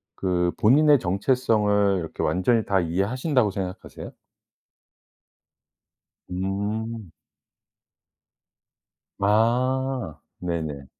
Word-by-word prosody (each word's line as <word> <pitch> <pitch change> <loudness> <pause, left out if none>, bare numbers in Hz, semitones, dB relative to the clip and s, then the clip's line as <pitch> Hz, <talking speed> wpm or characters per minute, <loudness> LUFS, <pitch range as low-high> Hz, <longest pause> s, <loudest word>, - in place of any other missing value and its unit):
그 90 -2 0
본인의 145 +6 +5
정체성을 105 -1 +1
이렇게 80 - -5
완전히 110 +5 +1
다 100 -1 +2
이해하신다고 105 - 0
생각하세요? 95 -1 -7 2.2
음. 100 +2 -4 2.1
아. 120 - +1 0.2
네네. 80 -6 -4
100 Hz, 165 characters per minute, -24 LUFS, 90-120 Hz, 2.2 s, 본인의